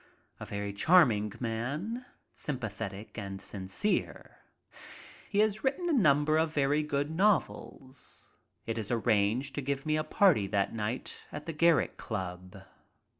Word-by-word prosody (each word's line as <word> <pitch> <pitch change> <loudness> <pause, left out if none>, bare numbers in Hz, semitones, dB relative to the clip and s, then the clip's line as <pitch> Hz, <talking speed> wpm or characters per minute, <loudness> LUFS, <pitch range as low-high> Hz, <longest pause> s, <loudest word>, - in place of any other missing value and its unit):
A - - -7
very 100 0 -4
charming 110 - +4
man, 140 - -3 0.3
sympathetic 110 -6 -5
and 100 -1 -6
sincere. 95 - -3 0.9
He 200 - -2
has 215 0 +1
writen 280 +7 0
a - - +2
number 155 - +4
of 160 -1 +1
very 145 0 +2
good 145 0 -1
novels. 160 -8 -1 0.3
It 115 0 -2
is 105 - -4
arranged 115 +3 +1
to 145 - -3
give 140 +1 -2
me 155 0 +1
a 155 - 0
party 160 - +3
that 100 0 0
night 115 +3 -4
at 145 - -7
the 165 - -4
Garrick 165 +1 +3
Club. 95 -2 -6
135 Hz, 135 wpm, -30 LUFS, 105-155 Hz, 0.9 s, charming